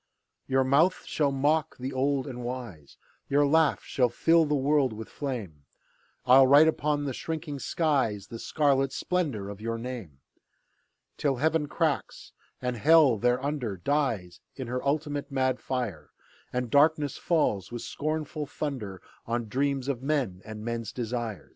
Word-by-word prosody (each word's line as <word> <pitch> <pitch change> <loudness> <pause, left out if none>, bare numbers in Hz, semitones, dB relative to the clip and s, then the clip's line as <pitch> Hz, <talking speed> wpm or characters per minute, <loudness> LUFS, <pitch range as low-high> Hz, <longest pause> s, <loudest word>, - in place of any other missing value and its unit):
Your 135 0 +3
mouth 150 +8 +3
shall 145 -3 0
mock 145 +3 +1
the 130 +2 -5
old 135 +1 0
and 125 -3 -6
wise, 120 - -7 0.3
Your 145 +1 +4
laugh 160 +1 +3
shall 125 -3 +1
fill 165 +7 +3
the 150 0 0
world 140 -2 +2
with 110 0 -8
flame, 110 - -5 0.6
I'll 130 +1 +7
write 145 +4 +7
upon 150 -2 0
the 135 - -2
shrinking 155 0 -5
skies 135 - 0
The 115 +2 -9
scarlet 135 -2 +1
splendour 145 - -1
of 100 0 -8
your 115 +1 -2
name, 115 - -7 1.0
Till 140 -3 +1
Heaven 155 +3 +1
cracks, 155 -1 -2 0.3
and 125 -1 -2
Hell 145 -3 +5
thereunder 125 -2 0
Dies 105 - -1 0.2
in 130 - -5
her 125 +2 -3
ultimate 145 0 -1
mad 130 -1 +1
fire, 110 - -4 0.4
And 125 -1 -2
darkness 145 -1 +3
falls, 115 - 0
with 120 -1 -5
scornful 155 0 -3
thunder, 115 - -5 0.2
On 115 0 -2
dreams 135 +2 -1
of 135 -4 -2
men 135 -10 -1
and 110 0 -8
men's 115 -2 -3
desire. 115 -3 -4
135 Hz, 150 wpm, -28 LUFS, 115-145 Hz, 1.0 s, I'll